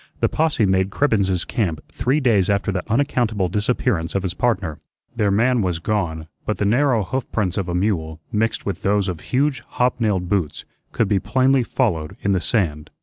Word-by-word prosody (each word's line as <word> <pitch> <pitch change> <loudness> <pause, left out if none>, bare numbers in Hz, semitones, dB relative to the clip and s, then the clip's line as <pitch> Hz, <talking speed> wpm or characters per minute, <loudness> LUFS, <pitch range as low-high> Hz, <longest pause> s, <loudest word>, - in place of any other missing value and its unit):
The - - +2
posse 155 -8 +1
made 95 0 +2
Cribbens's 100 -7 +1
camp 85 -10 -1
three 135 +5 +1
days 110 -9 +2
after 100 0 +1
the 90 -1 -1
unaccountable 115 -7 +1
disappearance 100 -4 0
of 95 - 0
his 90 -2 -2
partner. 95 -11 -1 0.4
Their 105 -3 +2
man 120 +4 +3
was 90 -3 0
gone, 85 -4 -2 0.2
but 110 - -2
the 105 - 0
narrow 120 +1 +3
hoof 130 +7 -4
prints 95 -5 0
of 95 -3 -2
a 90 - -1
mule, 85 -5 -1
mixed 115 +1 0
with 100 -4 -3
those 100 0 +1
of 90 -3 -3
huge 135 - 0
hob 125 0 0
nailed 100 -6 0
boots, 90 -5 -1 0.3
could 115 - +1
be 100 -1 +2
plainly 130 +5 +2
followed 90 - -1
in 100 - +2
the 95 -3 +1
sand. 80 -11 -1
100 Hz, 190 wpm, -21 LUFS, 90-120 Hz, 0.4 s, man